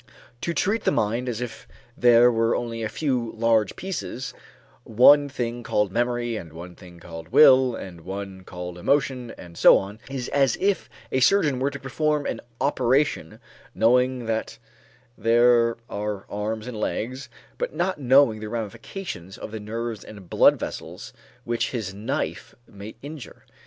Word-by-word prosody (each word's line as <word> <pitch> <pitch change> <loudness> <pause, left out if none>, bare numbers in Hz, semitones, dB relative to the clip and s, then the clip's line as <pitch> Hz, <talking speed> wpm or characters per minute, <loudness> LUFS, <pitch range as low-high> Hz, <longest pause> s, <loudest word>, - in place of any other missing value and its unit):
To 170 - -1
treat 205 +6 0
the - - +2
mind 115 +4 0
as 120 -1 -4
if 125 -2 -7 0.3
there 120 0 +6
were 115 0 +1
only 115 -1 -3
a 110 - -2
few 125 -3 -2
large 115 -2 +2
pieces, 130 - -5 0.5
one 140 +6 +6
thing 120 -3 -3
called 105 -4 0
memory 120 0 -1
and 85 -6 -9
one 85 +2 -9
thing 90 -2 -15
called 80 -1 -9
will 130 -2 +6
and 90 -5 -9
one 95 +1 -7
called 90 -1 -8
emotion 130 +1 0
and 85 -2 -12
so - - +7
on, 100 +3 -6
is 135 -3 -4
as 135 -3 +2
if 200 0 0 0.2
a 130 - +1
surgeon 145 -2 +3
were 135 +2 +1
to 140 - -7
perform 150 +2 -1
an - - -3 0.2
operation, 135 - +1 0.4
knowing 125 +3 +2
that 110 0 -3 0.6
there 115 0 +4
are 105 -1 -4
arms 105 +2 -3
and 125 -4 -6
legs, 130 +6 -3 0.3
but - - -3
not 185 -2 -1
knowing 130 -4 +4
the 105 0 -6
ramifications 115 - -6
of - - -8
the 110 - -5
nerves 115 +1 -5
and 100 -5 -13
blood - - +5
vessels 100 +10 -7 0.3
which 120 0 -1
his 110 -6 -4
knife 110 +7 -4
may 100 +2 -10
injure. 145 -4 -10
115 Hz, 155 wpm, -24 LUFS, 105-130 Hz, 0.6 s, so